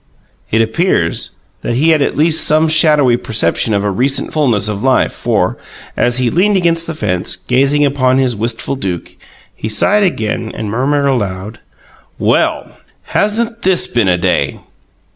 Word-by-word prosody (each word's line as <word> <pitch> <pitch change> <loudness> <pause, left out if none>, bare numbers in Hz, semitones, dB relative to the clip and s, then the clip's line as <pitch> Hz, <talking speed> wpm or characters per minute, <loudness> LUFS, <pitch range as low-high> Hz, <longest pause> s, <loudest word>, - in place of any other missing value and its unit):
It 115 +1 +2
appears 110 - -1 0.3
that 120 - -2
he 150 +6 +2
had 155 -2 +2
at 140 - -1
least 160 +1 +3
some 155 +1 +3
shadowy 150 -6 +4
perception 110 -1 0
of 100 - 0
a 105 - 0
recent 130 +8 0
fulness 120 -9 +1
of 105 -1 -4
life, 130 +1 +2
for, - - -1 0.4
as 120 0 +2
he 125 -2 +1
leaned 200 +4 +2
against 170 -2 0
the 165 - -5
fence, 90 - -2
gazing 140 +3 +1
upon 130 -2 +1
his 130 -3 +1
wistful 115 +5 -3
Duke, 95 -9 -5 0.4
he 110 - -6
sighed 200 - +2
again 115 - -1
and 105 -2 -5
murmured 140 +5 0
aloud: 105 -5 -2 0.6
"WELL, - - 0 0.4
HASN'T 230 +2 0
THIS 185 -1 +1
BEEN 120 - 0
A 90 -1 +2
DAY!" 90 +1 -1
130 Hz, 160 wpm, -14 LUFS, 110-155 Hz, 0.6 s, shadowy